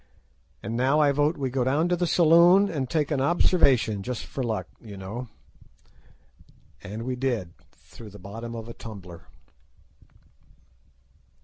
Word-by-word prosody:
And 115 - -4
now 130 +5 +2
I 145 -2 +4
vote 145 +3 +1
we 135 -2 -2
go 130 -1 0
down 145 +7 +1
to 180 - +2
the 175 0 -1
saloon 175 +4 +5
and 135 -6 -3
take 155 0 0
an 140 -3 0
observation 135 - +2
just 125 +3 -5
for 135 - -6
luck, 110 -3 -2
you 105 -4 -10
know." 105 +7 -6 1.5
And 105 +3 -7
we 130 +1 -3
did—through 115 -2 -6
the 105 - -13
bottom 115 +5 -8
of 115 0 -7
a 115 - -8
tumbler. 95 -8 -11
125 Hz, 140 wpm, -26 LUFS, 110-150 Hz, 1.5 s, saloon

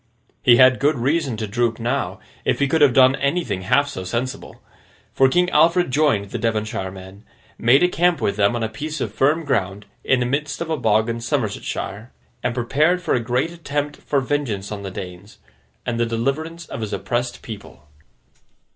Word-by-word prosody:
He 120 -1 +6
had 130 0 +6
good 145 +2 +2
reason 135 0 0
to 110 - -3
droop, 115 +2 0
now, 125 +4 -2 0.2
if - - +1
he 140 - +1
could 160 +3 +1
have 145 -3 +7
done 130 0 +6
anything 140 - -1
half 140 +10 +2
so 115 -10 -6
sensible; 120 +7 -4 0.5
for, 135 0 +4
King 180 +6 +3
Alfred 170 0 +3
joined 125 -9 +1
the 120 - -3
Devonshire 110 -4 -2
men; 95 +2 -12 0.4
made 130 +7 +5
a - - +6
camp 175 -1 +1
with 100 - 0
them 100 +3 +2
on 120 - -2
a - - +1
piece 150 +7 -5
of 110 -5 -3
firm 150 +7 +2
ground 100 -7 -1 0.2
in 130 - +2
the 125 - 0
midst 145 +4 -2
of 170 -1 -4
a - - +2
bog 110 -4 +2
in 115 0 -3
Somersetshire; 115 -3 -3 0.3
and 120 -1 -2
prepared 150 +9 +2
for - - 0
a - - +2
great 125 +7 -1
attempt 145 -3 -3
for 140 -2 -1
vengeance 125 -8 -2
on 105 -1 -5
the 100 - -5
Danes, 95 +1 -9 0.5
and 115 -1 -2
the 120 - +1
deliverance 155 +9 -2
of 115 - -7
his 110 -1 -4
oppressed 120 0 -3
people. 100 -8 -10
125 Hz, 190 wpm, -21 LUFS, 110-145 Hz, 0.5 s, have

